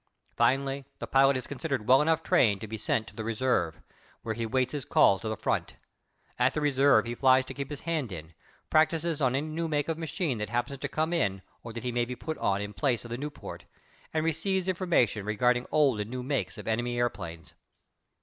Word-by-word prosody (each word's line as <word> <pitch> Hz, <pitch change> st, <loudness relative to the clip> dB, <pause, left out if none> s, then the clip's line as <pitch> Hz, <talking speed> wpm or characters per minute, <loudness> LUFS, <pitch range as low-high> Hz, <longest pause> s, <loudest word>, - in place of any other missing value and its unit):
Finally 135 Hz, +3 st, +1 dB
the -, -, -5 dB
pilot 135 Hz, 0 st, +4 dB
is 130 Hz, -, -5 dB
considered 140 Hz, -6 st, -3 dB
well 130 Hz, +2 st, +7 dB
enough 160 Hz, +1 st, +2 dB
trained 100 Hz, -5 st, +3 dB
to -, -, -6 dB
be 110 Hz, -, -5 dB
sent 110 Hz, +1 st, 0 dB
to -, -, -14 dB
the 110 Hz, -, -4 dB
reserve, 110 Hz, -8 st, 0 dB, 0.4 s
where 110 Hz, -, -2 dB
he 115 Hz, +1 st, -3 dB
waits 130 Hz, +1 st, +1 dB
his 145 Hz, -3 st, -3 dB
call 100 Hz, -7 st, +4 dB
to 110 Hz, -, -4 dB
the 110 Hz, -, -3 dB
front. -, -, -1 dB, 0.6 s
At 125 Hz, +2 st, +3 dB
the -, -, +1 dB
reserve 140 Hz, -5 st, +4 dB
he 120 Hz, -, -3 dB
flies 130 Hz, +1 st, +4 dB
to -, -, -7 dB
keep 140 Hz, -1 st, -5 dB
his 145 Hz, -2 st, -6 dB
hand 155 Hz, -9 st, -2 dB
in, 80 Hz, -2 st, -8 dB, 0.4 s
practises 160 Hz, 0 st, +2 dB
on 130 Hz, -1 st, +2 dB
any 140 Hz, +3 st, 0 dB
new 165 Hz, +2 st, -2 dB
make 150 Hz, 0 st, -1 dB
of 165 Hz, 0 st, -2 dB
machine 160 Hz, -, -2 dB
that 105 Hz, -, -3 dB
happens 120 Hz, +3 st, -2 dB
to -, -, -2 dB
come 160 Hz, +2 st, -1 dB
out 100 Hz, -, 0 dB, 0.2 s
or 115 Hz, -, -8 dB
that 115 Hz, -, -6 dB
he 125 Hz, -, -1 dB
may 120 Hz, 0 st, +1 dB
be 125 Hz, +1 st, -5 dB
put 160 Hz, +5 st, -5 dB
on 100 Hz, 0 st, +1 dB
in 105 Hz, 0 st, -6 dB
place 120 Hz, +1 st, 0 dB
of 120 Hz, -, -9 dB
the 120 Hz, -, -2 dB
Nieuport, 150 Hz, +1 st, -7 dB, 0.5 s
and 160 Hz, 0 st, 0 dB
receives 185 Hz, +4 st, 0 dB
information 170 Hz, -, +1 dB
regarding 120 Hz, +4 st, +1 dB
old 140 Hz, -7 st, +3 dB
and 105 Hz, +1 st, -3 dB
new 125 Hz, +1 st, -4 dB
makes 135 Hz, -2 st, -2 dB
of 105 Hz, -, -9 dB
enemy 120 Hz, +2 st, -1 dB
airplanes. 95 Hz, -9 st, -3 dB
130 Hz, 220 wpm, -29 LUFS, 115-150 Hz, 0.6 s, well